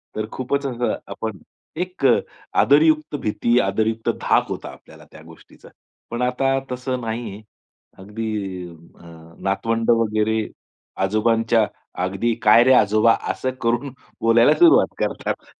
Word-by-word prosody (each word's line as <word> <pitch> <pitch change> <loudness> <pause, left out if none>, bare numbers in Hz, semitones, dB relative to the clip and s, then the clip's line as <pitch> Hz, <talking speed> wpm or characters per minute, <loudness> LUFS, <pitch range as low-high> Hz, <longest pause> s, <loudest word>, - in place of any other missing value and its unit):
तर 110 - -2
खूपच 140 +2 -2
असं 120 -2 -1
आपण 110 -4 -5 0.4
एक 180 -5 -3
अ, 125 - +6 0.4
आदरयुक्त 155 +1 +3
भीती, 120 +3 +1
आदरयुक्त 110 +3 -1
धाक - - +2
होता - - -5
आपल्याला - - -16
त्या 80 - -14
गोष्टीचा. 80 0 -17 0.4
पण 120 +1 -4
आता 135 +2 +1
तसं 125 0 -3
नाही. 110 -2 -5 0.6
अगदी 100 -3 -5
अ, 85 +1 -18 0.4
नातवंड 115 +4 -1
वगैरे 110 -1 +1 0.6
आजोबांच्या 110 +2 +2 0.4
अगदी, 100 +5 -1
"काय 110 +3 +6
रे 130 +1 +5
आजोबा" 110 0 +4 0.2
असं 130 - -3
करून 120 +3 -1 0.3
बोलायला 115 +1 +5
सुरुवात 340 -1 +5
करतात. - - -3
115 Hz, 125 wpm, -21 LUFS, 105-125 Hz, 0.6 s, अ